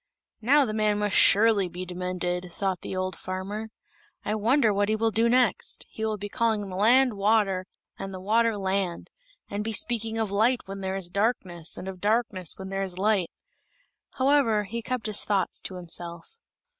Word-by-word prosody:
"Now, 280 Hz, +5 st, +4 dB
the 215 Hz, -, -3 dB
man 215 Hz, -1 st, +1 dB
must 205 Hz, -1 st, 0 dB
surely 205 Hz, -2 st, +5 dB
be 180 Hz, +2 st, -6 dB
demented!" 180 Hz, 0 st, -3 dB
thought 190 Hz, 0 st, -2 dB
the -, -, -5 dB
old 185 Hz, 0 st, -2 dB
farmer. 200 Hz, +4 st, -5 dB, 0.6 s
"I 210 Hz, -, 0 dB
wonder 225 Hz, +1 st, +3 dB
what 205 Hz, +1 st, +1 dB
he 215 Hz, -, +2 dB
will 225 Hz, +1 st, +1 dB
do 225 Hz, +2 st, +3 dB
next? 250 Hz, +1 st, +1 dB
He 220 Hz, -, -6 dB
will 215 Hz, -1 st, -1 dB
be 205 Hz, +1 st, -5 dB
calling 220 Hz, 0 st, 0 dB
the 185 Hz, -, -7 dB
land 245 Hz, +5 st, +4 dB
water, 200 Hz, -2 st, +1 dB, 0.3 s
and 195 Hz, 0 st, -5 dB
the 185 Hz, -, -7 dB
water 220 Hz, +3 st, +2 dB
land; 190 Hz, -2 st, -2 dB, 0.4 s
and 205 Hz, +1 st, -3 dB
be 225 Hz, +1 st, -3 dB
speaking 225 Hz, +1 st, -1 dB
of 220 Hz, -3 st, -1 dB
light 230 Hz, +5 st, +2 dB
where 195 Hz, -, -7 dB
there 190 Hz, -1 st, -3 dB
is 180 Hz, -3 st, -5 dB
darkness, 185 Hz, -6 st, -2 dB
and 190 Hz, -, -7 dB
of 185 Hz, -2 st, -7 dB
darkness 210 Hz, -5 st, 0 dB
when 190 Hz, 0 st, -7 dB
it 195 Hz, 0 st, -1 dB
is 185 Hz, -2 st, -6 dB
light." 195 Hz, -3 st, +1 dB, 0.8 s
However, 260 Hz, -6 st, +3 dB
he 230 Hz, +4 st, -5 dB
kept 250 Hz, 0 st, -3 dB
his 215 Hz, -2 st, +2 dB
thoughts 200 Hz, -2 st, -1 dB
to 185 Hz, -, -6 dB
himself. 175 Hz, -, -5 dB
205 Hz, 185 wpm, -26 LUFS, 185-225 Hz, 0.8 s, surely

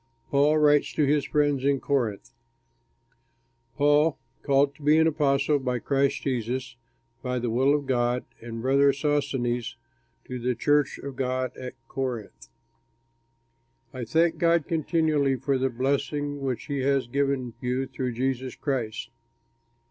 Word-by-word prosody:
PAUL 145 Hz, +2 st, +4 dB
WRITES 150 Hz, -1 st, +3 dB
TO 150 Hz, -, +2 dB
HIS 145 Hz, 0 st, +2 dB
FRIENDS 145 Hz, -3 st, +1 dB
IN 140 Hz, 0 st, +2 dB
CORINTH 120 Hz, -9 st, -2 dB, 1.4 s
Paul, 145 Hz, +2 st, +3 dB, 0.2 s
called 140 Hz, 0 st, +2 dB
to 140 Hz, -, -20 dB
be 150 Hz, +2 st, +4 dB
an 160 Hz, -, +5 dB
apostle 145 Hz, -2 st, +2 dB
of 125 Hz, -2 st, -2 dB
Christ 140 Hz, -1 st, +1 dB
Jesus 125 Hz, -1 st, -2 dB, 0.5 s
by 125 Hz, 0 st, -2 dB
the 120 Hz, -1 st, -2 dB
will 135 Hz, +5 st, +3 dB
of 145 Hz, -1 st, -2 dB
God, 125 Hz, -1 st, 0 dB, 0.2 s
and 115 Hz, 0 st, -7 dB
brother 140 Hz, +2 st, +4 dB
Sosthenes 135 Hz, -5 st, -1 dB, 0.5 s
to 125 Hz, -1 st, -6 dB
the 125 Hz, +1 st, -1 dB
church 145 Hz, +4 st, +2 dB
of 140 Hz, -1 st, -7 dB
God 130 Hz, 0 st, -2 dB
at 125 Hz, -1 st, -7 dB
Corinth. 125 Hz, -6 st, -5 dB, 1.5 s
I 130 Hz, -2 st, -5 dB
thank 160 Hz, +9 st, +1 dB
God 170 Hz, -2 st, +2 dB
continually 155 Hz, -4 st, +1 dB
for 135 Hz, +1 st, -1 dB
the 130 Hz, +1 st, +1 dB
blessing 140 Hz, +3 st, -2 dB
which 130 Hz, -4 st, -3 dB
he 140 Hz, -1 st, -3 dB
has 135 Hz, 0 st, +1 dB
given 135 Hz, -1 st, -1 dB
you 125 Hz, +2 st, -1 dB
through 130 Hz, -2 st, -4 dB
Jesus 130 Hz, +1 st, -2 dB
Christ. 120 Hz, -5 st, -3 dB
135 Hz, 140 wpm, -26 LUFS, 125-145 Hz, 1.5 s, an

